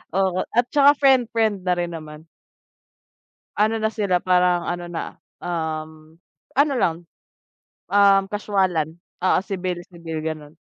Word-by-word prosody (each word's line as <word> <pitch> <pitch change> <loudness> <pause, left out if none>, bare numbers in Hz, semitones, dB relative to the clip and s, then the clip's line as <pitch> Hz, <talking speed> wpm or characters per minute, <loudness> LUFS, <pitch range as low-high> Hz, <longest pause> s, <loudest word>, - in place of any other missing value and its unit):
Oo, 190 -1 +1
at 240 +2 +2
saka 285 0 +6
friend, 265 -4 +4
friend 215 -3 +1
na 180 - +3
rin 175 -1 -3
naman. 155 0 -9 1.3
Ano 220 +2 +2
na 220 - 0
sila 200 -5 0
parang 180 -1 +2
ano 175 0 -3
na, 165 - -5 0.2
um, 160 -1 -5 0.4
ano 285 0 +4
lang, 170 -9 +1 1.0
um, 200 -1 +6
casualan, 190 -6 0 0.3
oo, 185 - +3
civil, 185 -3 -3 0.2
civil, 165 -2 -6
ganun. 155 0 -6
180 Hz, 130 wpm, -22 LUFS, 165-210 Hz, 1.3 s, saka